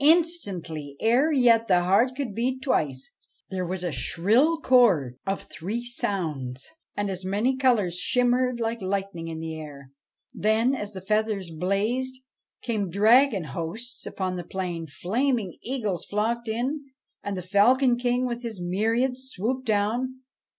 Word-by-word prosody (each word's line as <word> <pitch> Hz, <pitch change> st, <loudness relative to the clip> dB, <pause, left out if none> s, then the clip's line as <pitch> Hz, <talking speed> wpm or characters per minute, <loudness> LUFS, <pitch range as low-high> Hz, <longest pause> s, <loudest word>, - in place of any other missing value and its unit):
Instantly 200 Hz, -, +1 dB
ere 250 Hz, +8 st, +3 dB
yet 235 Hz, -5 st, +4 dB
the 180 Hz, -2 st, +4 dB
heart 210 Hz, +8 st, +3 dB
could 265 Hz, -6 st, -3 dB
beat 255 Hz, +4 st, -1 dB
twice 135 Hz, -, -1 dB, 0.4 s
there 185 Hz, -2 st, -2 dB
was 185 Hz, 0 st, -3 dB
a 175 Hz, -, -1 dB
shrill 215 Hz, -, +2 dB
chord 195 Hz, -, +3 dB
of 195 Hz, 0 st, -1 dB
three 220 Hz, +8 st, -5 dB
sounds, 155 Hz, -, -3 dB, 0.3 s
and 205 Hz, 0 st, 0 dB
as 190 Hz, -1 st, -4 dB
many 210 Hz, +8 st, +1 dB
colours 220 Hz, -10 st, +2 dB
shimmered 250 Hz, +3 st, +2 dB
like 230 Hz, 0 st, -2 dB
lightning 190 Hz, -3 st, -3 dB
in 160 Hz, -1 st, -5 dB
the 160 Hz, 0 st, -4 dB
air. 145 Hz, -4 st, -10 dB, 0.4 s
Then 220 Hz, +5 st, +2 dB
as 210 Hz, -5 st, -4 dB
the 190 Hz, -, -7 dB
feathers 210 Hz, -2 st, 0 dB
blazed, 210 Hz, +10 st, -1 dB, 0.5 s
came 215 Hz, -6 st, -1 dB
dragon 215 Hz, +2 st, +4 dB
hosts 170 Hz, -, -5 dB
upon 185 Hz, -1 st, -3 dB
the 175 Hz, -, -4 dB
plain; 175 Hz, -2 st, -4 dB
flaming 220 Hz, -, -1 dB
eagles 215 Hz, -9 st, -2 dB
flocked 230 Hz, +3 st, -1 dB
in; 255 Hz, +7 st, -2 dB, 0.4 s
and 200 Hz, -1 st, -4 dB
the 180 Hz, -, -4 dB
Falcon 240 Hz, +7 st, +4 dB
King 245 Hz, +1 st, 0 dB
with 240 Hz, -1 st, -3 dB
his 230 Hz, -5 st, -5 dB
myriads 230 Hz, +8 st, 0 dB
swooped 255 Hz, +5 st, -2 dB
down. 235 Hz, +5 st, 0 dB
215 Hz, 145 wpm, -26 LUFS, 180-250 Hz, 0.5 s, yet